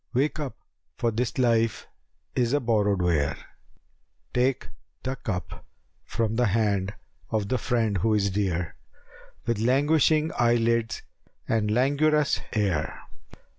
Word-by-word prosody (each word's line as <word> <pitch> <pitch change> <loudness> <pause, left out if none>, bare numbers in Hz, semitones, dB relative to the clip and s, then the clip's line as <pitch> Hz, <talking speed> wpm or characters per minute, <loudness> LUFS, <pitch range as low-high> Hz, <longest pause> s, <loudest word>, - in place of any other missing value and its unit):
* - - -46
Wake 145 +4 +1
up 145 -4 -4 0.4
for 115 - +1
this 115 +4 -2
life 115 -3 +2 0.5
is 125 -1 +1
a 145 - +4
borrowed 105 -6 +1
ware!' 80 -5 +1 1.0
Take 125 +1 +1 0.4
the 130 +1 -2
cup 90 -8 -5 0.4
from 115 -1 -1
the 125 -1 +3
hand 100 -1 +1 0.3
of 105 -2 -1
the 130 - +1
friend 115 -6 0
who 110 +4 +2
is 100 -1 +1
dear 95 -4 -1 0.3
* - - -23
With 115 -2 0
languishing 150 +6 +3
eye 120 0 +4
lids 115 -1 0 0.4
and 110 -2 +1
languorous 145 +5 +2
air. 95 -8 0
115 Hz, 130 wpm, -26 LUFS, 105-130 Hz, 1.0 s, a